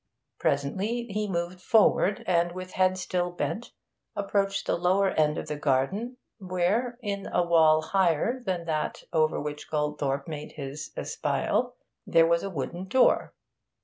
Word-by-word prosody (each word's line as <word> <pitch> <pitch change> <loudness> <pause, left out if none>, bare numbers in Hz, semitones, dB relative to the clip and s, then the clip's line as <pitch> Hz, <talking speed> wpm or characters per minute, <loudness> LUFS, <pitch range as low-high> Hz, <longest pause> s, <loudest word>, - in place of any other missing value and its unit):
Presently 190 +13 0
he 210 +1 -1
moved 175 0 -3
forward, 210 -2 +3
and, 175 -1 +2
with 185 0 -7
head 185 0 +2
still 180 -1 -1
bent, 190 +6 -4 0.4
approached 195 -1 0
the - - +1
lower 185 +3 +2
end 150 0 +2
of - - -4
the 150 - -3
garden, 150 - 0 0.2
where, 195 +6 0
in 200 -2 -3
a 175 - +2
wall 160 -2 +5
higher 190 - +1
than 180 -5 -2
that 155 -2 -2
over 155 -1 +2
which 150 0 -6
Goldthorpe 150 -2 -1
made 150 -2 -6
his 145 +1 -6
espial, - - -1 0.3
there 165 0 +5
was 170 0 +2
a 195 - -4
wooden 175 +3 -5
door. 255 +6 +3
175 Hz, 145 wpm, -27 LUFS, 155-195 Hz, 0.4 s, wall